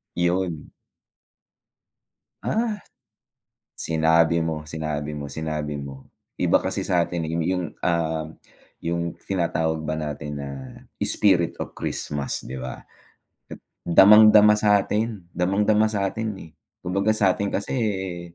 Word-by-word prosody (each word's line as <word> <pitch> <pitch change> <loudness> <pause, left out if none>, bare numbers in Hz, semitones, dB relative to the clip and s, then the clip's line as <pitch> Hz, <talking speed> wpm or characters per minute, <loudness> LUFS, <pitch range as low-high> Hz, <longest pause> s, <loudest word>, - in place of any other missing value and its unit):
Yon. 90 -2 -1 1.7
Ah, 220 -2 -1 1.0
sinabi 80 +1 +2
mo, 80 -1 -3
sinabi 75 -1 -4
mo, 75 -1 -5
sinabi 75 0 -4
mo. 70 -1 -8 0.3
Iba - - +3
kasi - - -2
sa 90 -2 +2
'tin, 85 -1 -3
eh, - - -5
yu 85 - 0
yung, 90 +1 -1 0.2
um, 80 -2 0 0.5
yung 85 0 -2 0.2
tinatawag 80 -4 -1
ba 80 0 -3
natin 75 -1 -5
na, 70 0 -5 0.5
"spirit 85 -5 +2
of - - -6
Christmas" 70 -1 -3
'di 65 0 -6
ba? 65 -1 -8 0.6
At - - -8 0.3
damang-dama 105 +3 +8
sa 105 -1 +3
'tin, 105 -3 -2
damang-dama 105 +4 +2
sa 100 -2 -1
'tin, 110 0 -3 0.2
eh. 80 - -14 0.3
Kumbaga 100 +4 -1
sa 95 -3 +4
'tin 100 +1 -2
kasi, 100 - -3
eh 95 -6 -2
85 Hz, 130 wpm, -24 LUFS, 80-100 Hz, 1.7 s, damang-dama